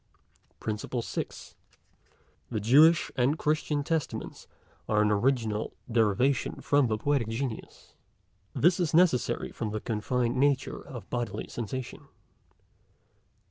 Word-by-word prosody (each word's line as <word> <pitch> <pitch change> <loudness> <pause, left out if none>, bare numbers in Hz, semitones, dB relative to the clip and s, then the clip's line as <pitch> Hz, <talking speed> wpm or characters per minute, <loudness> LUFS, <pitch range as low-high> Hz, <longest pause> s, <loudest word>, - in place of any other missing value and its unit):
PRINCIPLE 110 +3 -3
SIXTH. - - -6 1.0
The 110 - -2
Jewish 150 +10 +5
and 130 +4 +2
Christian 150 -1 0
Testaments 160 0 -3 0.4
are 105 -1 +3
an 105 - +2
original 110 -1 0 0.2
derivation 115 +4 +1
from 145 -2 +2
the 110 -1 0
Poetic 140 -1 0
Genius. 115 +1 -5 0.6
This 175 +4 +3
is 165 -3 0
necessary 170 -8 +2
from 110 - -4
the 110 +1 -3
confined 120 +3 -1
nature 140 0 +1
of 120 -5 -9
bodily 115 -4 -3
sensation. 120 +2 -6
125 Hz, 110 wpm, -28 LUFS, 110-145 Hz, 1.0 s, Jewish